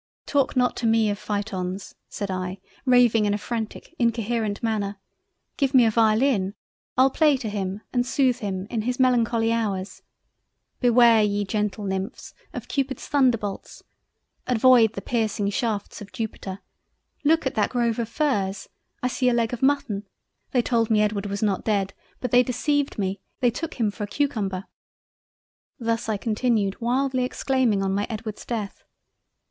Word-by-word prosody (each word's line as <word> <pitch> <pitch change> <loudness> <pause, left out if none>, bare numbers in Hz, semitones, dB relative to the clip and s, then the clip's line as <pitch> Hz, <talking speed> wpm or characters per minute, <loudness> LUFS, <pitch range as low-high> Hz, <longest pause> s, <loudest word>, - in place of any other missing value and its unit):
"Talk 280 -1 +1
not 250 -1 +2
to 235 - 0
me 225 -1 +3
of 205 - -4
Phaetons 200 -3 -4 0.2
(said 200 -2 -4
I, 185 0 -3 0.3
raving 245 -4 +5
in 205 0 +2
a - - -1
frantic, 225 +6 -5
incoherent 230 -2 0
manner)—Give 215 +5 -4
me 250 -2 +7
a 225 - +3
violin—. 220 -2 +2 0.4
I'll 265 +1 +5
play 300 -1 +4
to 240 - -5
him 200 -1 -3
and 245 -1 +2
sooth 250 0 +1
him 195 -4 -3
in 230 -3 -1
his 250 +3 -2
melancholy 235 -3 +3
Hours—Beware 230 +3 0
ye 205 -1 +1
gentle 210 0 -2
Nymphs 190 0 -4 0.2
of - - -7
Cupid's 270 -3 -2
Thunderbolts, 235 -8 0 0.6
avoid 245 -2 +5
the - - -6
piercing 215 -3 0
shafts 215 -3 -2
of 205 - -10
Jupiter—Look 225 +8 -3
at 265 - 0
that 215 - +1
grove 235 -2 0
of 230 -1 -2
Firs—I 215 -4 -2
see 250 0 +1
a 240 - +2
Leg 230 0 0
of 245 - -4
Mutton—They 245 -2 -1
told 230 -2 +1
me 215 -1 +4
Edward 205 -1 -1
was 200 +2 -3
not 200 -3 0
Dead; 195 -3 0 0.3
but 250 - -3
they 245 - +7
deceived 285 +4 0
me—they 200 +5 -1
took 320 +7 -5
him 220 -4 0
for 210 0 -5
a - - -12
cucumber—" 205 -8 -1 1.1
Thus 230 -1 -1
I 215 - +1
continued 215 -2 0
wildly 255 +2 +1
exclaiming 250 -5 +1
on 195 0 0
my 205 +1 0
Edward's 215 -1 -6
Death—. 215 -4 -4
225 Hz, 150 wpm, -24 LUFS, 205-250 Hz, 1.1 s, me